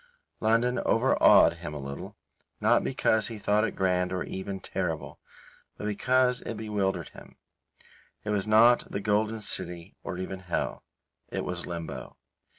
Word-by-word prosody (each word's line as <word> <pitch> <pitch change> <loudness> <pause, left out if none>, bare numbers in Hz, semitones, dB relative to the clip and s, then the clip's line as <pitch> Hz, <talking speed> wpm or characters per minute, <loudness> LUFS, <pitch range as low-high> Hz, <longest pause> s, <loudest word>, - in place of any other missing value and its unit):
London 115 +3 +2
overawed - - +5
him 75 - -7
a - - -5
little, 70 0 -7 0.4
not - - +3
because 110 -1 +1
he 115 -1 -6
thought 105 +1 +2
it 115 - -1
grand 90 -1 +1
or 90 -1 -1
even 95 0 -5
terrible, 90 -5 -4 0.6
but - - -6
because 125 +4 +2
it 115 - -5
bewildered 105 -3 -1
him; - - -14 0.9
it 105 - -2
was 105 -1 0
not 115 +3 +5
the - - -2
Golden 105 +2 0
City 85 -1 -5
or 90 - -5
even 95 +1 -5
hell; 90 -2 -3 0.5
it - - -3
was 90 -1 -3
Limbo. 80 -7 -6
100 Hz, 150 wpm, -28 LUFS, 90-110 Hz, 0.9 s, overawed